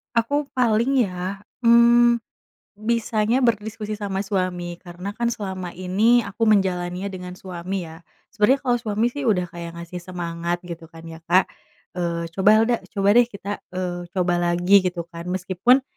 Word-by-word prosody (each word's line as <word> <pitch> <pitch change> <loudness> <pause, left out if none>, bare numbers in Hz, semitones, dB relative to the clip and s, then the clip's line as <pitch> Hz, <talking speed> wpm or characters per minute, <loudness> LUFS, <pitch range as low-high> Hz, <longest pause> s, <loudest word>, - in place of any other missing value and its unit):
Aku 285 +6 +1
paling 250 +2 +3
ya, 185 0 -4 0.2
mmm, 235 0 +6 0.6
bisanya 230 +2 +1
berdiskusi 215 -2 -1
sama 195 -1 -2
suami 180 -3 -2
karena 180 +2 -7
kan 235 +3 -2
selama 190 -6 -4
ini 205 +7 +3
aku 205 +3 -1
menjalaninya 190 -2 +1
dengan 180 -1 -7
suami 185 0 -5
ya. 160 0 -10 0.3
Sebenernya 240 +6 +2
kalau 245 -2 +1
suami 225 +1 0
sih 285 0 -4
udah 190 -5 +3
kayak 170 -1 -7
ngasih 170 +1 -7
semangat 175 -1 -4
gitu 170 -1 -8
kan 165 0 -14
ya 165 -1 -9
Kak, 180 +2 +3 0.5
eee, 170 -1 -2
"Coba 190 +4 +3
Helda 235 0 +1 0.2
coba 200 0 +3
deh 240 +2 +5
kita, 205 -2 -6 0.2
eee, 175 -1 -3
coba 175 -1 +1
lagi," 175 +3 +4
gitu 175 -1 -3
kan 170 +1 -8
meskipun, 185 +8 +2
190 Hz, 155 wpm, -23 LUFS, 175-225 Hz, 0.6 s, mmm